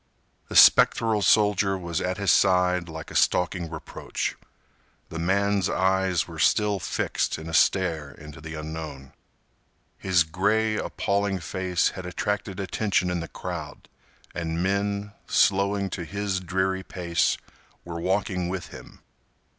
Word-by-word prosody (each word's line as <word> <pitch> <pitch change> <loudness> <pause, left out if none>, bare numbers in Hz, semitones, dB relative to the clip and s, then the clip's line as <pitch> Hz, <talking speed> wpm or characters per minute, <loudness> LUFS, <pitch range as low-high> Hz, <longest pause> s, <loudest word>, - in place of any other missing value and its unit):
The - - -6
spectral 110 -2 +6
soldier 105 -2 +3
was 85 -1 -3
at 90 +1 -2
his 100 -2 +2
side 90 -2 +3
like 80 -1 -8
a - - -9
stalking 90 -1 +1
reproach. 80 - -5 0.7
The 85 - -6
man's 100 +2 +1
eyes 95 -2 +1
were 85 -2 -9
still 105 +4 +2
fixed - - -1
in 80 - -8
a 80 - -6
stare 80 -4 +2
into 75 +2 -12
the 80 0 -7
unknown. 75 -3 -7 0.9
His 90 -3 +3
gray, 105 +7 +1
appalling 100 -1 -1
face 90 -1 0
had 95 -1 -8
attracted 100 +1 -3
attention 95 -1 0
in 90 - -1
the 85 - -5
crowd, - - -7 0.4
and 85 0 -2
men, 100 +1 -1 0.2
slowing 100 0 +2
to 90 - -4
his 100 +2 -2
dreary 95 +1 -1
pace, 85 -2 0 0.5
were 85 -1 -6
walking 95 -1 -1
with 90 -1 -5
him. - - -13
95 Hz, 135 wpm, -25 LUFS, 85-100 Hz, 0.9 s, spectral